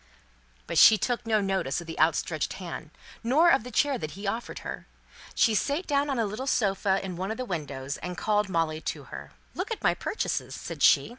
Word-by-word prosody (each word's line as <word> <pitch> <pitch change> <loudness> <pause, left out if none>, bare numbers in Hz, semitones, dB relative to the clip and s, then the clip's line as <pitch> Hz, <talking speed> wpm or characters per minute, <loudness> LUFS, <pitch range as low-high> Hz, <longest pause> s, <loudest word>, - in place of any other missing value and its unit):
But - - +1
she 220 - +9
took 240 +1 -2
no 215 -2 +3
notice 190 -9 -1
of 170 - -8
the 165 0 -7
outstretched 155 0 +1
hand, 170 -4 -7 0.3
nor 305 +9 +5
of - - +3
the 250 - -7
chair 270 +2 +1
that 155 +1 -6
he 200 - -7
offered 225 +4 -3
her. - - -6 0.5
She 225 - +4
sate 285 - 0
down 285 0 +1
on 270 - 0
a 230 - +1
little 215 +6 -4
sofa 195 -5 +2
in 180 -2 -5
one 190 +2 -3
of 220 - -3
the 255 - -3
windows, 145 - -4
and 180 0 -6
called 210 -1 +1
Molly 160 -3 0
to - - -4
her. - - -8 0.2
"Look - - -4
at 450 - -4
my - - +4
purchases," - - -3
said - - -7
she. - - +5
200 Hz, 215 wpm, -27 LUFS, 170-245 Hz, 0.5 s, she